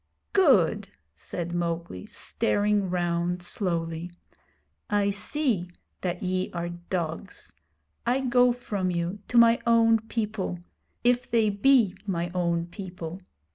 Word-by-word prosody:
'Good!' 210 - +4 0.2
said 175 0 -5
Mowgli, 170 - -3
staring 205 - 0
round 175 0 -1
slowly. 170 -2 -1 0.8
'I 205 -1 +2
see 205 - -1 0.3
that 180 0 -3
ye 185 0 -1
are 175 0 -3
dogs. 175 - -5 0.5
I 255 +3 +1
go 250 -1 +4
from 205 -6 -2
you 175 +3 -2
to 245 - 0
my 235 0 +7
own 230 -1 +5
people 215 -4 -3 0.5
if 245 0 +2
they 225 -3 +3
be 225 -1 +4
ray 175 -2 -1
own 170 -2 0
people. 180 -1 -7
185 Hz, 115 wpm, -27 LUFS, 175-225 Hz, 0.8 s, my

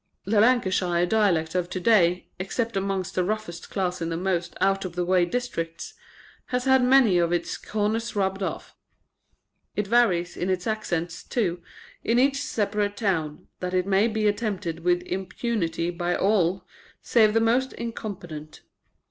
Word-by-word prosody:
The 205 +2 +2
Lancashire 185 -7 +2
dialect 180 -6 +2
of 180 -1 -1
to 185 - -3
day 180 -3 +3
except 225 +4 -2
amongst 195 -2 -2
the 185 - +1
roughest 190 -4 -4
class 180 -2 -2
in 165 - -2
the 165 - -2
most 180 -1 -2
out 195 0 +2
of 180 -3 -6
the 180 0 -1
way 180 -1 +3
districts 175 - -4 0.5
has 250 0 -1
had 265 -1 +5
many 250 -8 +5
of 170 0 +1
its 175 -1 -1
corners 220 +2 -2
rubbed 195 -1 0
off. 190 - -4 1.0
It 210 - 0
varies 195 -6 +2
in 180 - -2
its 185 -1 -1
accents, 175 -6 -2
too, 180 -8 -1 0.4
in 230 - +2
each 275 +2 +3
separate 205 -1 -1
town, 165 -8 -1
that 180 0 -3
it 180 0 +2
may 200 +2 +3
be 220 -1 -1
attempted 205 -6 -2
with 175 +1 +1
impunity 185 -2 -2
by 175 0 -1
all 190 -2 +1 0.4
save 220 -2 +4
the - - +5
most 245 +4 +2
incompetent. 180 -9 -7
190 Hz, 155 wpm, -25 LUFS, 175-220 Hz, 1.0 s, had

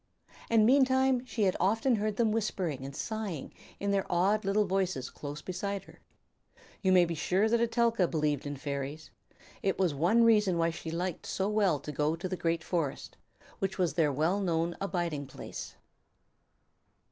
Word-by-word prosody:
And 225 -2 +5
meantime 260 0 +4
she 225 - -1
had 190 -2 +2
often 225 +6 +2
heard 210 0 -1
them 225 -2 +2
whispering 185 - -2
and 135 0 -7
sighing 215 - -4 0.3
in 200 0 -1
their 195 -1 0
odd 195 +5 +2
little 205 +2 +2
voices 185 -9 -1
close 145 +1 -7
beside 195 +1 -3
her. - - -17 0.8
You 190 - +2
may 180 -1 +6
be 170 - -3
sure 185 +6 +1
that 235 +1 +2
Etelka 230 -4 +2
believed 150 -3 -1
in 145 0 -4
fairies. 140 +1 -5 0.5
It 195 - 0
was 185 -5 +2
one 175 +11 +3
reason 210 -6 +4
why 165 0 +2
she 160 0 -7
liked 175 +1 -3
so 190 - -1
well 200 -8 +2
to 150 - -6
go 150 +2 0
to 170 +3 -4
the 185 - -3
great 165 -1 -1
forest, 160 -7 -3 0.4
which 195 0 -2
was 175 -6 +1
their 155 -3 +2
well 160 +8 +1
known 170 -3 0
abiding 170 -7 -2
place. - - -8
185 Hz, 170 wpm, -30 LUFS, 160-210 Hz, 0.8 s, may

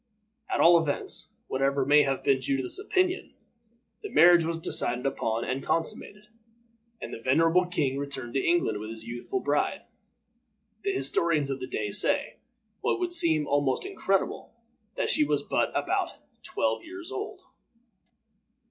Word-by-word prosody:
At - - -1
all 170 0 +7
events, 145 - -3 0.2
whatever 135 0 0
may 145 +2 +6
have 135 -2 -1
been 135 -2 +2
Judith's 135 - -2
opinion, 370 -1 -1 0.7
the 415 - -6
marriage 175 - +6
was 165 0 -2
decided 125 -6 +2
upon 115 -4 -1
and 130 +1 -2
consummated, 200 +7 -2 0.7
and - - -7
the 115 - -7
venerable 165 +8 +3
king 140 -6 -1
returned 135 -4 -5
to 135 - 0
England 170 -12 +1
with 110 +1 -7
his 115 0 -7
youthful 120 - -4
bride. - - 0 1.0
The 200 - -1
historians 145 0 0
of 135 - -3
the 130 - -5
day 105 -1 -3
say, - - +1 0.4
what - - 0
would 355 -1 -2
seem 160 - +2
almost 145 - 0
incredible, 195 - -2 0.4
that - - 0
she 310 - +4
was - - 0
but - - 0
about - - -1 0.2
twelve - - -1
years 355 +2 -9
old. 410 0 -6
145 Hz, 150 wpm, -27 LUFS, 130-190 Hz, 1.0 s, all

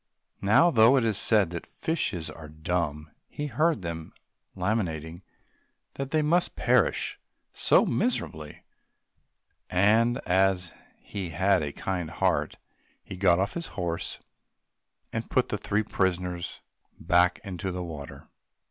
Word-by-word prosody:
Now, 110 - +5
though 115 +2 +6
it 125 - +2
is 110 -2 +1
said 100 -4 +4
that 85 - -6
fishes 90 - -2
are 80 0 -10
dumb, 80 -1 -3 0.2
he 150 - -5
heard 155 - +1
them 80 -1 -6 0.4
lamenting 85 -4 -2 0.7
that 135 -1 -5
they 155 +1 +1
must 170 +4 +1
perish - - +1 0.3
so - - +4
miserably, 80 - -2 1.1
and, 110 +6 +3
as 90 -1 +2 0.2
he 95 -4 -6
had 95 +3 +2
a 75 -1 -3
kind 90 0 -3
heart, - - 0 0.5
he - - -8
got 90 -2 +4
off 100 +2 0
his 170 -1 -4
horse 85 -3 -3 0.9
and - - -3
put - - +1
the - - -1
three 105 +1 0
prisoners 90 -3 -2 0.4
back 90 +1 +3
into 95 -1 -4
the 90 0 -4
water. 75 -5 -8
95 Hz, 130 wpm, -27 LUFS, 85-110 Hz, 1.1 s, though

